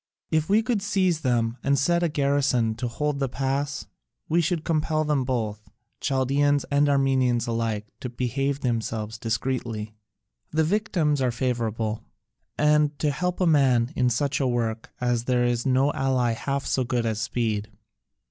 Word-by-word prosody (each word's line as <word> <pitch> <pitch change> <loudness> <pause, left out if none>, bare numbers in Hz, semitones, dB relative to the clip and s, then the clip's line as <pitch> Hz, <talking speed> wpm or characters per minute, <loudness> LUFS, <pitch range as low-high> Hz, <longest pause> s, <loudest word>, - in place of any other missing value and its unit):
If 155 +1 +1
we 215 +3 +4
could 220 -2 0
seize 190 -5 +1
them 120 -3 0
and 140 0 +2
set 170 +6 +2
a 170 - +2
garrison 140 -5 +1
to 125 +1 -2
hold 150 +4 -2
the 135 -2 0
pass, 135 +2 -2 0.4
we 170 +2 +2
should 165 0 -1
compel 155 -1 0
them 150 -3 +1
both, 110 -5 -3 0.3
Chaldaeans 140 +1 +1
and 145 +1 +3
Armenians 130 -3 +2
alike, 115 -2 -2
to 125 - -5
behave 135 +3 -2
themselves 110 -2 -2
discreetly. 115 -2 -2 0.6
The 160 +1 +1
victims 165 -6 +1
are 130 - +2
favourable; 115 -3 -2 0.6
and 150 -1 +3
to 150 - +1
help 180 +5 -2
a 185 - +2
man 135 -5 +3
in 125 -1 +2
such 140 +5 0
a 135 - +1
work 115 -2 -2
as 120 -1 0
this - - -27
there 125 -1 +2
is 120 +1 0
no 135 +2 +3
ally 130 -3 +1
half 140 +4 -2
so 130 - +1
good 120 -1 -1
as 110 -1 -1
speed. 110 -3 -1
130 Hz, 165 wpm, -25 LUFS, 120-150 Hz, 0.6 s, we